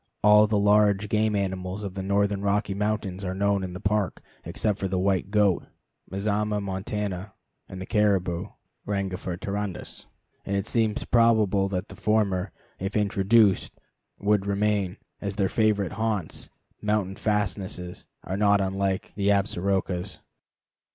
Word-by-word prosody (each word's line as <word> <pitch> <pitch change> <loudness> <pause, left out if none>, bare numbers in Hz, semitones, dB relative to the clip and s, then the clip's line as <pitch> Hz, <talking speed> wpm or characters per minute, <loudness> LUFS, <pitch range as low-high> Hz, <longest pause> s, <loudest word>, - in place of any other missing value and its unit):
All 105 +1 +7
the 105 0 +1
large 105 0 +3
game 110 0 +2
animals 95 0 -2
of 100 -2 -4
the 95 - -4
northern 100 +1 +1
Rocky 100 0 0
Mountains 100 -2 -2
are 95 0 -3
known 100 0 +1
in 90 -1 -5
the 90 - -6
Park 100 0 0 0.2
except 105 -2 -1
the 95 -1 -1
white 95 0 +1
goat 105 -3 +2 0.4
(Mazama 105 +1 0
montana) 100 0 -4 0.4
and 95 - -7
the 95 - -5
caribou 95 -6 +1 0.4
(Rangifer 95 -3 -2
tarandus), 100 -1 -4 0.4
and 100 - -2
it 100 - 0
seems 110 -3 +1
probable 110 -4 +3
that 95 0 -3
the - - -10
former, 100 -3 +1 0.3
if 95 +3 -2
introduced, 100 0 +3 0.4
would 100 -1 +1
remain, 100 -1 0 0.2
as 100 -1 -3
their 100 -2 +1
favorite 105 -4 +1
haunts, 110 -5 -2 0.3
mountain 105 -2 0
fastnesses, 95 -4 -2 0.2
are 95 - -3
not 100 0 +4
unlike 95 0 -1
the 100 -1 -1
Absarokas. 95 -1 0
100 Hz, 135 wpm, -26 LUFS, 95-105 Hz, 0.4 s, All